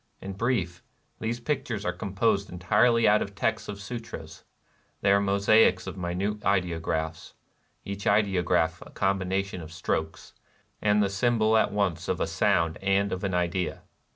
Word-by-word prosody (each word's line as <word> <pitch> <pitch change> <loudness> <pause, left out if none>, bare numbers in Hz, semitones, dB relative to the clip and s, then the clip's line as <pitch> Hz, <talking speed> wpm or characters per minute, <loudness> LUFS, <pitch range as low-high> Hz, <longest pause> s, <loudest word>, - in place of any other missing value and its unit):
In 100 - -6
brief, 95 -5 -1 0.4
these 115 +2 -2
pictures 120 -6 -3
are - - 0
composed 100 +1 0
entirely 115 +7 +3
out 105 +1 +5
of 100 0 -5
texts - - -1
of 100 -1 -6
Sutras: 105 -7 -8 0.6
they 100 - +3
are 100 0 +4
mosaics 100 -1 +4
of 95 0 -6
minute 95 +4 -3
ideographs, 85 -3 -1 0.2
— - - -42
each 100 0 -5
ideograph 95 -5 +2
a - - -14
combination 95 -1 -1
of 80 0 -10
strokes, 80 0 -3 0.5
and 105 -1 +3
the - - +2
symbol 110 +1 +2
at 110 - +3
once 95 -5 -1
of - - -1
a - - +1
sound 85 -1 +1
and 100 +1 +1
of 95 +1 -3
an 95 -2 -1
idea. 90 +1 -1
100 Hz, 155 wpm, -27 LUFS, 90-105 Hz, 0.6 s, out